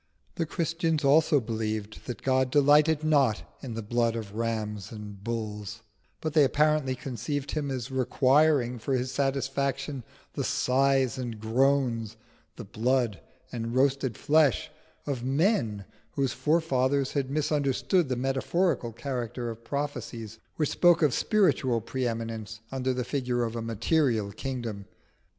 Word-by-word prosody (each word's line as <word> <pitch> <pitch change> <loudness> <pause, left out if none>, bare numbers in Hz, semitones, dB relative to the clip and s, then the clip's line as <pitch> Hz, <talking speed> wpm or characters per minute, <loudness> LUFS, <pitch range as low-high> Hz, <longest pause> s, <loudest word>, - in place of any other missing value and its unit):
The 165 - -2
Christians 165 -2 -1
also 145 +1 +5
believed 110 -2 -4
that 120 -4 -6
God 130 -1 +2
delighted 150 +3 +4
not 140 -8 +3 0.2
in 125 -5 -6
the 115 - -4
blood 115 +1 +1
of 110 -3 -6
rams 110 -3 -3
and 105 -2 -8
of 95 - -19
bulls, 110 -1 -4 0.4
but 155 -1 -2
they 155 -2 +6
apparently 150 -1 +2
conceived 140 +2 -4
Him 150 -2 -2
as 130 -1 -4
requiring 130 0 +3
for 135 +4 -1
His 125 0 -1
satisfaction 135 0 -1 0.3
the - - -2
sighs 135 -1 +2
and 120 -4 -5
groans, 115 -1 +1 0.4
the 120 - -8
blood 115 +1 0 0.3
and 115 0 -4
roasted 130 -3 +1
flesh 150 -3 +2 0.3
of 135 -4 -3
men 135 - +1 0.3
whose 135 -3 0
forefathers 140 -4 +1
had 135 -2 -1
misunderstood 150 +3 +1
the 130 - 0
metaphorical 135 +2 0
character 120 -1 -4
of 115 +1 -11
prophecies 120 -5 -5 0.2
which 150 -3 0
spoke 175 -2 +4
of 145 -5 +3
spiritual 140 - +2
pre 125 +3 -2
eminence 115 -1 -5
under 130 -1 -1
the 125 -1 -2
figure 125 -3 -1
of 115 0 -3
a 115 - -3
material 115 -1 +1
kingdom. 120 -6 -5
130 Hz, 140 wpm, -28 LUFS, 115-145 Hz, 0.4 s, they